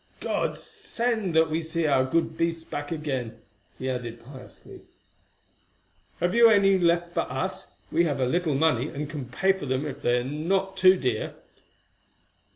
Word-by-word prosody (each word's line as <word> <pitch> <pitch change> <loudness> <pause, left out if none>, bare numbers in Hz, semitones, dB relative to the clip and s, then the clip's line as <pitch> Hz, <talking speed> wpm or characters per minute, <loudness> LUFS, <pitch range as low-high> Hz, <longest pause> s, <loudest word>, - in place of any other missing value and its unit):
God - - -1
send 235 - -3
that 160 0 +4
we 160 +1 0
see 165 0 -2
our 135 -3 +3
good 165 +6 0
beasts 165 -1 -1
back 145 -1 -6
again," 130 -8 -3 0.4
he 130 - -5
added 120 -2 -5
piously. 130 -1 -13 1.4
"Have 175 +2 +1
you 235 -1 +7
any 195 -3 +4
left 170 0 +1
for - - -1
us? - - -3 0.2
We 170 - +3
have 145 -4 -1
a 130 - +2
little 160 +2 0
money, 140 -3 +2
and 145 +1 -5
can 145 -3 -6
pay 190 +9 +2
for 190 -7 -7
them 130 +3 -1
if 140 -3 -6
they 120 0 +2
be 130 - -5
not 190 +6 -1
too 185 0 +6
dear." 125 -8 -2
160 Hz, 165 wpm, -26 LUFS, 130-180 Hz, 1.4 s, you